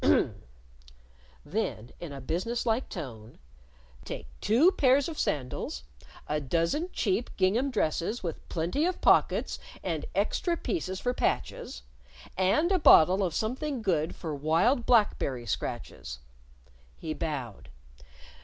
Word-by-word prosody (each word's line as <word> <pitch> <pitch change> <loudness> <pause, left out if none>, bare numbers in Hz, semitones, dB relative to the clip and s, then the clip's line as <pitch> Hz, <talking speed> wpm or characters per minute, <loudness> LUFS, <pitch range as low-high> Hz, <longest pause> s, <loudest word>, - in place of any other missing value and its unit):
"Hm! - - +4
Hm!" - - -1 1.0
Then, 145 - -3
in 170 -4 -7
a 140 - -7
business 185 - -2
like 230 +2 0
tone; 115 - -8 0.7
"_Take - - -6 0.2
two 255 - +5
pairs 270 -4 +3
of 325 -3 -6
sandals, 125 - -2 0.4
a 150 - 0
dozen 170 - 0
cheap 215 +3 0
gingham 215 +9 +2
dresses 210 - -1
with 165 -3 -5
plenty 180 - 0
of 365 - -2
pockets - - +3 0.2
and - - -2
extra 345 -2 +1
pieces 190 - -3
for 245 - 0
patches, - - -2 0.5
and 205 - +2
a 375 - +3
bottle 185 - +7
of 175 -4 -1
something 255 +3 -2
good 165 -5 0
for 160 -3 -5
wild 165 - +2
black 225 -4 +4
berry 125 -3 -3
scratches_." 65 - -4 0.8
He 155 - -4
bowed. 135 -10 -5
185 Hz, 130 wpm, -29 LUFS, 150-250 Hz, 1.0 s, bottle